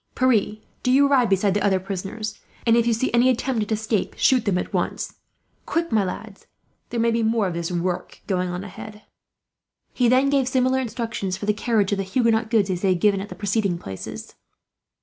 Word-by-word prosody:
"Pierre, 235 -5 +2 0.3
do 250 - +1
you 280 +2 +5
ride 260 -6 +3
beside 195 0 +2
the 205 0 0
other 195 -2 +3
prisoners 195 +3 -5 0.3
and, 230 -1 +5
if 235 0 +3
you 235 - +3
see 230 +2 -1
any 240 +2 +5
attempt 255 -1 0
at 210 - -4
escape, 215 -1 -1
shoot 255 -4 +3
them 195 -4 +1
at - - -4
once. - - -2 0.5
"Quick, 335 0 -1
my 215 -2 +3
lads; 195 +2 -7 0.4
there 235 - -3
may 230 0 +3
be 230 0 +1
more 225 -1 +1
of 180 - -2
this 170 +1 -3
work 175 +1 -3
going 185 -2 -1
on, 180 +1 -4
ahead." 210 +2 -10 0.9
He 245 -2 +2
then 260 +3 +4
gave 275 -3 +2
similar 260 0 +2
instructions, 230 -6 -3
for 205 - -6
the 210 - +2
carriage 215 -2 +1
of 200 - 0
the - - 0
Huguenot 225 +2 +1
goods, 210 -4 +2
as 180 -1 -3
he 190 -2 +3
had 200 +1 +3
at 200 +2 -6
the - - -8
preceding 200 -3 0
places. 95 - -8
215 Hz, 210 wpm, -23 LUFS, 195-235 Hz, 0.9 s, you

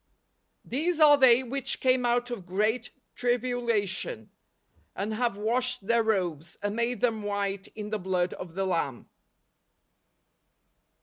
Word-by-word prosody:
" - - -45
These 325 +4 0
are 300 -2 +8
they 260 -2 +6
which 265 +1 -2
came 255 -1 +2
out 245 +1 +1
of 195 -7 -6
great 215 +6 0 0.3
tribu¬ 245 0 0
lation, 200 - -2 0.7
and 205 +3 -2
have 230 -2 0
washed 245 +1 -1
their 235 +2 +3
robes, 175 -7 -1
and 205 +1 -1
made 235 +1 -1
them 225 -3 +1
white 200 -1 -2
in 210 -1 -6
the 215 - -1
blood 180 -1 0
of 170 -2 -9
the 195 0 0
Lamb." 165 -9 -2
220 Hz, 140 wpm, -28 LUFS, 195-245 Hz, 0.7 s, are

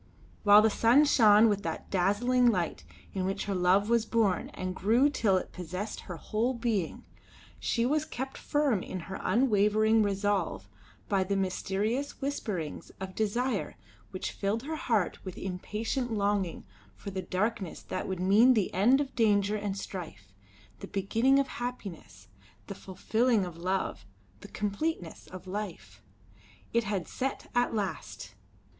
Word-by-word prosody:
While 205 +1 +7
the 220 - +4
sun 240 +8 +5
shone 220 -5 +6
with 205 -2 +1
that - - -5
dazzling 220 +7 +3
light 180 -8 0 0.3
in 190 - -2
which 190 +1 -2
her 200 - -2
love 185 +2 +3
was 235 -1 +3
born 215 -6 +1
and 185 0 -3
grew 235 +10 +3
till 200 -9 +2
it - - -4
possessed 185 +4 -5
her 175 -3 -8
whole 230 - -1
being, 225 -8 -2 0.6
she 235 -1 0
was 300 +4 +1
kept 265 -3 -6
firm 285 -9 +1
in 185 0 -5
her 190 +3 -7
unwavering 215 -2 +3
resolve 200 - 0 0.4
by 195 -2 +2
the 200 +1 -1
mysterious 195 +7 -1
whisperings 210 - -4
of 190 0 -6
desire 220 +2 -1 0.3
which 185 - -4
filled 210 +4 -2
her 315 +3 -4
heart 230 - -1
with 185 -2 -7
impatient 215 +7 -3
longing 200 -4 -1 0.3
for 200 - -8
the 190 0 -3
darkness 195 0 -2
that - - -4
would 190 -2 -3
mean 215 +8 +5
the 210 -4 0
end 240 +9 +4
of 275 -2 -4
danger 210 -3 +3
and 205 -2 -3
strife, 160 - -8 0.5
the - - -7
beginning 225 +7 +2
of 275 -1 +2
happiness, 195 - -7 0.4
the 200 - -6
fulfilling 220 +3 0
of 175 -2 -8
love, 185 - -2 0.4
the 205 - -11
completeness 205 - -3
of 185 0 -10
life. 175 - -6 0.7
It 235 -1 +2
had 195 -4 -2
set 270 +1 -4
at 245 -1 +1
last! 200 -3 -4
205 Hz, 150 wpm, -29 LUFS, 190-235 Hz, 0.7 s, While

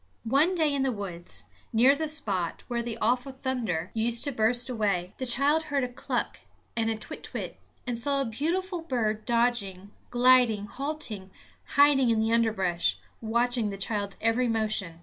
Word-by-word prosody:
One 280 +10 +3
day 310 -4 +2
in 280 - 0
the 265 -1 +1
woods, 185 -5 -6 0.3
near 250 +5 +5
the 315 +1 -2
spot 200 - -1
where 240 -1 -1
the 235 -1 -4
awful 245 +4 0
thunder 235 -11 -2
used 230 +1 0
to 285 - 0
burst 240 +1 +2
away, 200 -6 -1
the 260 - -2
child 285 +6 +3
heard 285 -3 0
a - - 0
cluck 245 +1 -3 0.4
and 225 -1 0
a 225 - -1
kwitkwit, 215 - -7 0.3
and 240 -2 -3
saw 280 +3 +1
a 275 - +1
beautiful 340 - -2
bird 220 -8 -1
dodging, 230 -5 0 0.2
gliding, 245 -4 +4
halting, 255 -6 -4 0.5
hiding 280 -3 +5
in 225 -1 +2
the 220 +1 +1
underbrush, 195 -7 +1 0.2
watching 235 0 +1
the 200 - -5
child's 200 0 -2
every 230 +2 +2
motion. 215 -7 -1
235 Hz, 165 wpm, -28 LUFS, 215-270 Hz, 0.5 s, near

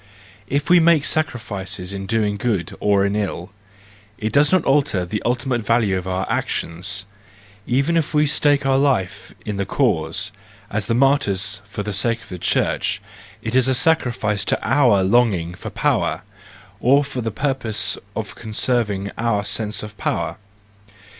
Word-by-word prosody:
If 145 +5 -1
we 180 0 +6
make 165 -3 +4
sacrifices 100 - -2
in 95 0 -5
doing 105 -2 0
good 100 -5 -2
or 100 -1 +3
in 100 - 0
doing 105 0 +1
ill, 90 -1 -6 0.7
it 110 0 -3
does 145 +1 +4
not 185 -3 +3
alter 135 -10 +2
the 105 +4 -3
ultimate 125 0 0
value 110 -3 +2
of 95 0 -3
our 95 0 -1
actions; 100 +4 -2 0.6
even 140 +7 +1
if 165 -3 +1
we 150 0 +3
stake 145 -1 +2
our 135 0 +3
life 100 -9 -1
in 105 -2 -3
the 100 - -1
cause, - - 0 0.4
as 105 +1 -2
martyrs 115 -7 +2
for 105 +1 -5
the 105 0 -4
sake 115 +3 0
of - - -16
our 90 - -6
church, - - 0 0.4
it - - -3
is 130 0 +4
a 130 - +3
sacrifice 120 -9 +1
to - - +1
our 120 -6 +4
longing 95 -5 +2
for - - -7
power, - - 0 0.6
or 140 +4 +4
for 135 -3 -5
the 115 - -2
purpose 125 -2 0 0.2
of - - -4
conserving 105 -3 -1
our 110 -3 0
sense 105 0 -2
of 105 0 -8
power. - - -2
110 Hz, 160 wpm, -21 LUFS, 100-135 Hz, 0.7 s, we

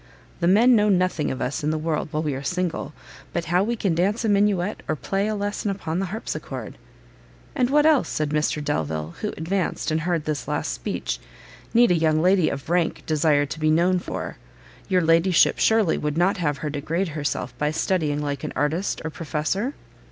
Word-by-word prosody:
The 170 - +1
men 230 +7 +6
know 210 -1 +3
nothing 185 -5 +1
of 130 - -3
us 130 +4 -3
in 150 - +1
the 155 - 0
world 155 0 -1
while 155 +1 -2
we 150 -2 -1
are 135 - -4
single, 180 +3 -2 0.4
but 170 -1 -1
how 180 +2 +4
we 235 +3 -1
can 195 -6 0
dance 200 +7 +1
a - - +2
minuet, 200 -1 +1
or 155 - 0
play 195 +7 -1
a 215 - -1
lesson 205 0 -2
upon 180 -4 -3
the 195 - -1
harpsichord." 155 - -6 0.7
"And 250 -1 +1
what 295 +2 +4
else," 310 -4 +4
said 155 -1 -1
Mr 150 0 0
Delvile, 80 - -2
who - - -1
advanced, 175 +1 -1
and 155 +1 +1
heard 170 -2 -1
this 150 -4 -3
last - - -1
speech, - - -3 0.5
"need 235 -3 +5
a - - +4
young 155 -1 +2
lady 180 0 +4
of 135 0 -5
rank 170 0 0
desire 150 -2 +2
to 145 +3 -7
be 155 0 +2
known 175 +4 +3
for? - - -5 0.5
your 185 -1 +3
ladyship 165 +2 +4
surely 220 -6 +3
would 150 +1 -2
not 180 +3 +2
have 150 -5 -1
her 150 +1 -4
degrade 165 +6 -2
herself 145 -4 -3
by 150 - +1
studying 155 -2 0
like 145 0 -3
an 155 - -4
artist 160 +7 -1
or 160 - -3
professor?" 170 - -2
165 Hz, 200 wpm, -24 LUFS, 150-195 Hz, 0.7 s, men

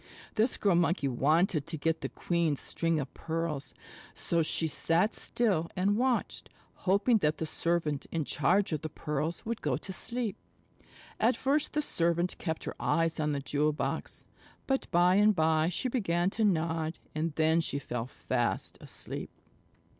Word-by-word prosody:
This 225 +4 +2
Girl 200 -3 +3
Monkey 170 -3 +2
wanted 155 +4 +2
to 165 -1 -3
get 165 +2 0
the - - -3
queen's 170 -5 0
string 165 -1 0
of 135 -3 -5
pearls, 160 -3 -3 0.4
so 170 -1 0
she 160 +1 +2
sat 165 +6 +1
still 195 -9 0
and 195 +2 +2
watched, 250 +1 0 0.4
hoping 205 +5 +4
that 150 -5 +1
the 160 - -2
servant 160 -2 -1
in 160 -3 -1
charge 180 +10 +2
of 155 -2 -1
the 155 - -4
pearls 150 +2 -3
would 230 0 -3
go - - 0
to 190 - -6
sleep. 235 -1 -2 0.8
At 235 +4 +3
first 285 +3 +1
the 300 0 +1
servant 170 - 0
kept 160 -3 -3
her - - -4
eyes 165 -1 +1
on 150 -1 +1
the 140 -1 -1
jewel 150 +2 +1
box. 150 - -3 0.4
But 270 0 -1
by 175 +2 +4
and 210 0 +5
by 160 0 +3
she 185 +8 -1
began 190 -7 +1
to 220 - -1
nod, 165 -4 +1 0.2
and 155 0 -2
then 160 +1 +3
she 140 - -1
fell 120 -4 -4
fast 120 -2 -2
asleep. - - -4
165 Hz, 165 wpm, -30 LUFS, 155-195 Hz, 0.8 s, and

